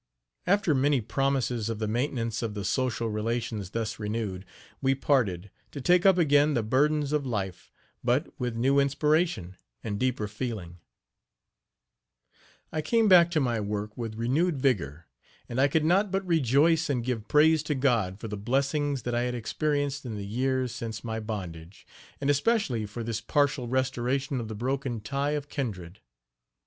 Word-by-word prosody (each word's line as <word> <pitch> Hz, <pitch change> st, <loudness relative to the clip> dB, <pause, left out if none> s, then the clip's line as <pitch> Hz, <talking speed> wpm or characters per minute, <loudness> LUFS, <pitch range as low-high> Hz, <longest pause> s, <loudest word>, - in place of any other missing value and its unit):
After 200 Hz, -3 st, +3 dB
many 140 Hz, 0 st, +3 dB
promises 125 Hz, -1 st, -1 dB
of 115 Hz, -, -2 dB
the 110 Hz, 0 st, -2 dB
maintenance 115 Hz, -1 st, -1 dB
of 110 Hz, -3 st, -3 dB
the 100 Hz, -1 st, -4 dB
social 120 Hz, 0 st, 0 dB
relations 110 Hz, -2 st, -2 dB
thus 110 Hz, 0 st, -3 dB
renewed, 105 Hz, -3 st, -3 dB, 0.4 s
we 135 Hz, 0 st, +2 dB
parted, 105 Hz, -10 st, 0 dB, 0.2 s
to 145 Hz, -, -7 dB
take 180 Hz, +7 st, +4 dB
up 190 Hz, -2 st, +6 dB
again 145 Hz, -2 st, +4 dB
the 115 Hz, -, +1 dB
burdens 145 Hz, +5 st, +1 dB
of 150 Hz, -1 st, +1 dB
life, 100 Hz, -8 st, -4 dB, 0.3 s
but 125 Hz, +5 st, +2 dB
with 125 Hz, -2 st, -2 dB
new 135 Hz, +4 st, +3 dB
inspiration 140 Hz, -, +1 dB, 0.3 s
and 100 Hz, -3 st, -3 dB
deeper 125 Hz, -4 st, 0 dB
feeling. 105 Hz, -6 st, -5 dB, 1.9 s
I 155 Hz, -, -1 dB
came 225 Hz, +8 st, +2 dB
back 175 Hz, -3 st, +7 dB
to 165 Hz, -2 st, +1 dB
my 120 Hz, -5 st, 0 dB
work 105 Hz, 0 st, -3 dB
with 115 Hz, -3 st, -5 dB
renewed 145 Hz, +8 st, +1 dB
vigor, 85 Hz, -, 0 dB, 0.4 s
and 120 Hz, +2 st, -1 dB
I 140 Hz, -, +5 dB
could 155 Hz, +2 st, +1 dB
not 195 Hz, +5 st, +3 dB
but 195 Hz, +1 st, -1 dB
rejoice 160 Hz, +1 st, +3 dB
and 125 Hz, -4 st, -1 dB
give 115 Hz, -4 st, -3 dB
praise 155 Hz, +1 st, +5 dB
to 150 Hz, -, -2 dB
God 115 Hz, -8 st, +1 dB
for 115 Hz, -, -6 dB
the 105 Hz, -, -4 dB
blessings 135 Hz, +5 st, 0 dB
that 120 Hz, -, -2 dB
I 120 Hz, -, +1 dB
had 125 Hz, 0 st, -1 dB
experienced 145 Hz, +3 st, -1 dB
in 120 Hz, -4 st, -5 dB
the 100 Hz, -1 st, -5 dB
years 130 Hz, +3 st, -1 dB
since 110 Hz, -2 st, -5 dB
my 110 Hz, -1 st, -3 dB
bondage, 95 Hz, -5 st, -7 dB, 0.3 s
and 140 Hz, -, -2 dB
especially 145 Hz, -, +1 dB
for 115 Hz, +3 st, -6 dB
this 115 Hz, -1 st, -3 dB
partial 145 Hz, -4 st, +1 dB
restoration 130 Hz, +1 st, -1 dB
of 115 Hz, -, -5 dB
the 110 Hz, -, -6 dB
broken 130 Hz, 0 st, -2 dB
tie 140 Hz, +5 st, -1 dB
of 145 Hz, 0 st, -6 dB
kindred. 100 Hz, -, -5 dB
125 Hz, 165 wpm, -28 LUFS, 110-145 Hz, 1.9 s, back